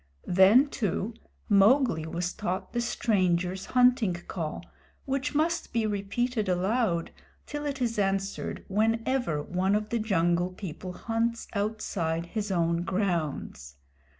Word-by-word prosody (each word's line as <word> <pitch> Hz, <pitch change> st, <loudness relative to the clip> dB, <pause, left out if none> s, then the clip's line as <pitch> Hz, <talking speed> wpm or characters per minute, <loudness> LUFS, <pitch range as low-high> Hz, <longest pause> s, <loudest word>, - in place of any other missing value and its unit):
Then, 195 Hz, +10 st, +6 dB
too, 220 Hz, -4 st, -2 dB, 0.3 s
Mowgli 205 Hz, -, +4 dB
was 175 Hz, +2 st, -2 dB
taught 185 Hz, +1 st, -4 dB
the 240 Hz, -, 0 dB
Strangers' 185 Hz, -5 st, 0 dB
Hunting 250 Hz, -7 st, +4 dB
Call, 170 Hz, -2 st, -5 dB, 0.4 s
which 275 Hz, +2 st, -2 dB
must 330 Hz, +3 st, 0 dB
be 230 Hz, -2 st, +1 dB
repeated 215 Hz, +2 st, -1 dB
aloud 185 Hz, -1 st, +1 dB, 0.3 s
till 295 Hz, 0 st, -4 dB
it 280 Hz, -1 st, -3 dB
is 230 Hz, -3 st, -1 dB
answered, 195 Hz, 0 st, -2 dB
whenever 225 Hz, -, 0 dB
one 185 Hz, +3 st, 0 dB
of 210 Hz, 0 st, -1 dB
the 235 Hz, -, 0 dB
Jungle 175 Hz, -4 st, +1 dB
People 185 Hz, -1 st, -7 dB
hunts 230 Hz, +3 st, -2 dB
outside 200 Hz, -6 st, -2 dB
his 210 Hz, +3 st, -4 dB
own 170 Hz, -1 st, +1 dB
grounds. 170 Hz, -, -2 dB
200 Hz, 125 wpm, -28 LUFS, 175-235 Hz, 0.4 s, Then